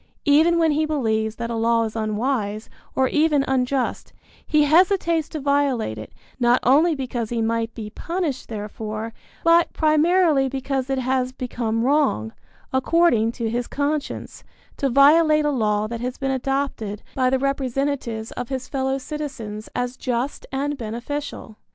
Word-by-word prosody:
Even 315 +4 +5
when 325 -2 +3
he 300 +1 +1
believes 220 -7 0
that 235 +1 -4
a - - -2
law 230 0 +2
is 220 -1 -4
unwise, 215 -1 -2 0.2
or 265 - +3
even 300 -2 +2
unjust, 260 0 -1 0.3
he 305 -1 +3
hesitates 335 0 +3
to 310 - -5
violate 275 - 0
it, 110 - -9 0.3
not 240 0 +4
only 305 +6 +4
because 245 -4 -3
he 235 - -2
might 225 0 0
be 210 -2 -6
punished 330 - -3
therefor, 215 +1 -5 0.3
but 335 0 +4
primarily 310 -2 +3
because 270 0 -2
it 270 - 0
has 255 0 0
become 235 -3 -2
wrong, 265 - +1 0.4
according 260 -4 +3
to 230 -1 -3
his 235 +2 -2
conscience, 290 +1 -3 0.3
to 275 - 0
violate 305 +3 +5
a 295 - +2
law 210 -5 +1
that 230 +1 -5
has 250 +1 -3
been 270 0 -1
adopted 265 -6 -2
by 255 -1 +2
the 265 - +2
representatives 270 -4 -2
of 245 - -5
his 260 -1 -4
fellow 265 -1 -1
citizens 265 -7 -6
as 245 0 -2
just 250 +2 -3
and 280 +2 -2
beneficial. 235 0 -5
265 Hz, 150 wpm, -23 LUFS, 230-290 Hz, 0.4 s, Even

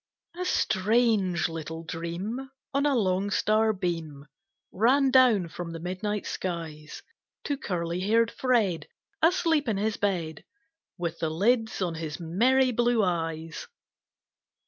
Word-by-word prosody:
A 365 +1 -3
STRANGE 205 - +2
little 160 0 -6
Dream 175 +11 -5 0.2
On 280 +1 +2
a 285 - +2
long 195 -3 +1
star 215 +1 +2
beam 165 -7 -4 0.5
Ran 260 +7 +3
down 245 -9 +5
from 165 0 -7
the 165 - -6
midnight 190 +4 -3
skies, 160 -4 -5 0.4
To 285 - -1
curly 175 - -3
hair'd 225 +4 +2
Fred 225 -10 +1 0.3
Asleep 325 -4 +3
in 215 -3 0
his 210 +1 -1
bed, 170 -6 -2 0.5
With 170 -2 -3
the 160 - 0
lids 220 +5 +1
on 175 -2 -1
his 160 -1 -5
merry 250 +10 +3
blue 240 -1 +2
eyes. 165 -2 -3
195 Hz, 125 wpm, -27 LUFS, 165-235 Hz, 0.5 s, down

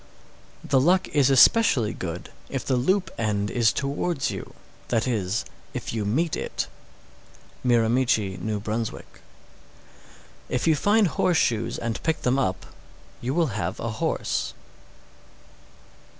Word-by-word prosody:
_ - - -25 0.6
632. - - -10
The 135 -1 +4
luck 185 +4 +3
is 140 -3 +3
especially 135 - +5
good 90 0 -6 0.2
if 135 - -4
the 130 - +1
loop 185 +10 +1
end 105 -3 0
is 115 +1 +3
towards 140 +2 -1
you, - - -7 0.3
that 115 -2 +1
is, 105 -4 -1 0.3
if - - -4
you 110 -3 -2
meet 150 +10 +1
it. - - -3 1.0
Miramichi, 115 -4 +2
N.B. 95 - -6
633. 110 +2 -3 1.4
If 125 - -1
you 160 -1 +4
find 205 +7 +3
horseshoes 140 -8 +1
and 115 -1 -3
pick 160 -1 -1
them 130 +2 +2
up, 95 -9 -1 0.6
you 130 +4 -2
will 165 -9 +1
have 95 0 -3
a 115 - -3
horse. - - -1
125 Hz, 135 wpm, -25 LUFS, 110-145 Hz, 1.4 s, especially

